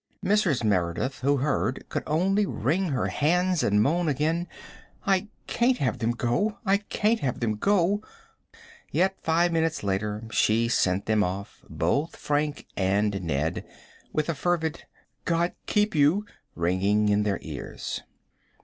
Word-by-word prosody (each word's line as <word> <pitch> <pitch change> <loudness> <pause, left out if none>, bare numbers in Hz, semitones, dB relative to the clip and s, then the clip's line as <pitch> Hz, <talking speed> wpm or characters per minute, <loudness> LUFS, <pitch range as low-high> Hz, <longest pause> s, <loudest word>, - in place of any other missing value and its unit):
Mrs. 185 - +2
Merideth, 105 +7 0
who 140 +2 +2
heard, 135 -1 -1
could - - -2
only 195 +6 +2
wring 165 - 0
her 135 -3 0
hands 180 +3 +2
and 105 +1 +3
moan 170 +6 +1
again: 155 +5 0 0.6
"I 195 +1 +2 0.2
can't 245 +1 +2
have 125 -5 -1
them 115 -1 0
go 130 - 0
I 195 0 +4
can't 210 +2 0
have 130 -3 -2
them 115 -3 0
go!" 200 - +2 0.9
Yet 190 +1 +1
five 170 +2 +2
minutes 165 -4 0
later 105 +2 -2
she 115 +2 +2
sent 95 -4 +1
them 110 -1 +2
off, 95 +2 -5
both 90 - 0
Frank 145 0 -1
and 100 +1 +1
Ned, 80 -2 -1 0.5
with 155 -1 -1
a 170 - 0
fervid 160 +1 -1 0.4
"God 170 +1 +1
keep 210 0 +2
you" 155 +7 +3 0.3
ringing 95 +5 +2
in 105 0 +3
their 105 -2 0
ears. - - -6
145 Hz, 140 wpm, -26 LUFS, 105-175 Hz, 0.9 s, I